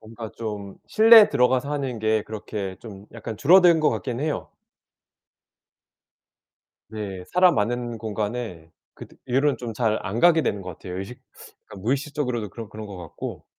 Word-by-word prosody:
뭔가 110 0 -9
좀 105 -3 -6
실내에 225 -1 +7
들어가서 130 0 +2
하는 135 -5 -3
게 110 0 +1
그렇게 105 -3 -6
좀 100 -3 -11
약간 115 -1 -7
줄어든 175 +1 +6
것 155 - +4
같긴 125 -2 -4
해요. 150 0 -3 2.4
네. 100 -4 -6
사람 180 0 +5
많은 120 +2 -2
공간에 105 -5 -4 0.2
그때 - - -13
이후로는 135 +3 +2 0.2
잘 110 -1 +1
안 105 +3 -3
가게 165 -2 +5
되는 100 - -1
것 90 - -6
같아요. 90 +1 -8
의식 100 +6 -8 0.5
그러니까 - - -12
무의식적으로도 125 -3 -2
그런 115 +2 -8
그런 110 0 -8
것 100 -2 -9
같고. 85 -3 -8
115 Hz, 315 characters per minute, -24 LUFS, 105-135 Hz, 2.4 s, 실내에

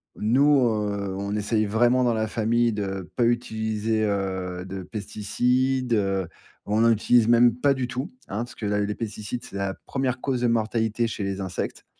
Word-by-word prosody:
nous, 140 +7 +4
heu, 105 -4 0
on 100 +1 -3
essaye 105 +1 +1
vraiment 120 +4 +3
dans 120 -1 +2
la 110 0 0
famille 115 +1 +1
de 95 -4 -4
pas 120 - +2
utiliser, 110 -2 0
heu, 95 -3 -2
de 95 0 -6
pesticides, 125 +6 0
heu. 95 -4 +1 0.4
On 105 +2 +1
n'en 115 0 +5
utilise 115 +1 +3
même 120 0 +5
pas 140 +3 +3
du 130 -2 -2
tout, 130 +6 -4 0.2
hein, 105 - -4
parce 120 +1 -5
que 110 - -6
la 105 0 +1
les 105 0 -2
pesticides 110 +2 -5
c'est - - -11
la 100 -1 -1
1re 130 -2 -1
cause 130 -2 -1
de 125 - +3
mortalité 115 0 0
chez 110 -2 -4
les 100 0 -3
insectes. 95 -2 -4
110 Hz, 185 wpm, -25 LUFS, 100-120 Hz, 0.4 s, n'en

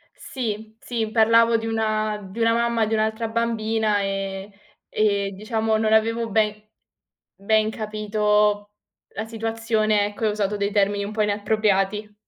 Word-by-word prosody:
Sì, 220 -3 -5
sì, 225 -3 -3
parlavo 230 +1 +4
di 225 0 -4
una 215 -1 -1
di 230 - -7
una 230 0 +4
mamma 235 -1 +1
di 220 - -1
un'altra 220 +1 0
bambina, 220 -2 0
ehm, 195 0 -4 0.4
e 200 -2 +1
diciamo 220 +2 -1
non 220 0 +1
avevo 225 +1 +2
ben 215 0 0 0.7
ben 215 +2 +1
capito 210 -1 0 0.4
la 220 - -3
situazione, 225 -2 0
ecco, 205 +2 -5
e - - +3
ho - - +1
usato 210 -1 -1
dei 200 0 -1
termini 200 0 +1
un 205 - -6
po' 215 0 0
inappropriati. 210 0 0
215 Hz, 145 wpm, -23 LUFS, 210-225 Hz, 0.7 s, parlavo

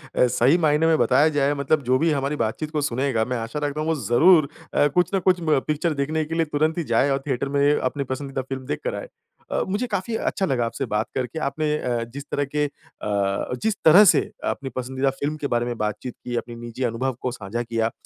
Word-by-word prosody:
अ, 125 - +4
सही 130 +7 +3
मायने 155 -1 +3
में 160 - +4
बताया 145 +4 +4
जाए, 145 -1 +1
मतलब 140 +1 0
जो 130 +1 +3
भी 165 0 +2
हमारी 140 +1 -1
बातचीत 150 +6 -2
को 150 - -1
सुनेगा, 130 -4 0
मैं 125 0 -2
आशा 115 +6 -4
रखता 145 +1 -2
हूँ 155 - -2
वो 160 - +2
ज़रूर 155 +4 +5 0.2
अ, 145 - +4
कुछ 180 +5 +1
ना 195 - +3
कुछ 185 0 +2
म 155 -4 +2
पिक्चर 155 +2 0
देखने 155 +3 -1
के 160 +2 -4
लिए 165 -1 +2
तुरंत 155 +3 +1
ही 170 - 0
जाए 135 +5 +3
और 135 - +1
थिएटर 135 +1 -1
में 140 +1 +3
अपनी 140 +1 -1
पसंदीदा 135 +1 -4
फ़िल्म 130 0 -6
देख 145 - -3
कर - - -2
आए। - - -6 0.4
अ, - - +1
मुझे 210 +6 -1
काफ़ी 220 +2 -2
अच्छा 195 -3 -1
लगा 125 -6 0
आपसे 135 +4 -3
बात 105 -1 -1
करके। 130 +4 -3
आपने 155 +1 -1
अ, 120 -4 -1
जिस 140 0 -6
तरह 145 - 0
के 150 0 +2
अ, - - -3 0.9
जिस 220 -2 +1
तरह 175 +6 +9
से - - +6 0.3
अपनी 135 -1 -5
पसंदीदा 130 +2 -1
फ़िल्म 150 +2 -1
के 145 - -3
बारे 120 0 +1
में 120 -1 -4
बातचीत 105 +3 -3
की, 120 -1 -4
अपनी 120 0 -4
निजी 120 +2 -6
अनुभव 125 +2 -1
को 125 - -1
साझा 120 +1 -4
किया 115 -1 0
अ, - - -5
140 Hz, 240 wpm, -23 LUFS, 125-155 Hz, 0.9 s, तरह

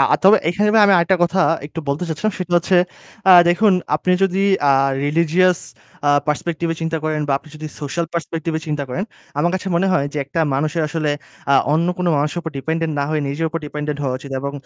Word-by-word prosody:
আ - - +6
তবে 205 +3 +8
এখানে 205 +4 +1 0.2
আমি 200 - +5
আরেকটা 180 +2 +2
কথা 180 +3 -2 0.3
একটু 160 +2 -7
বলতে 145 +5 -1
চাচ্ছিলাম। 200 +7 -2
সেটা 180 -1 -5
হচ্ছে 180 +2 +1 0.5
আ - - +10 0.2
দেখুন 200 +4 +4 0.2
আপনি 180 +3 0
যদি 195 0 +1 0.3
আ - - +6 0.3
religious 170 +3 +2 0.5
আ - - +5 0.2
perspective 165 +2 -2
এ - - -4
চিন্তা 165 0 -2
করেন 155 -1 -1
বা - - +2
আপনি 155 - -19
যদি 155 0 -7
social 155 +4 -3
perspective 165 -1 -3
এ - - -10
চিন্তা 150 -2 -2
করেন, 180 +11 -3 0.3
আমার 170 +3 +2
কাছে 190 +1 -3
মনে 190 - +1
হয় 140 -6 +1
যে 150 - -3
একটা 140 +4 -3
মানুষের 155 +4 -1
আসলে 155 -1 -1 0.4
আ - - +6 0.2
অন্য 165 +2 +2
কোনো 180 - 0
মানুষের 150 +4 -1
উপর 160 - -5
dependent 160 +2 -2
না 140 - +1
হয়ে 155 -1 0
নিজের 155 +4 -2
উপর 165 - -4
dependent 150 0 -4
হওয়া 130 -2 -1
উচিত। 140 +1 -11
এবং 140 0 -4
165 Hz, 215 wpm, -19 LUFS, 150-175 Hz, 0.5 s, আ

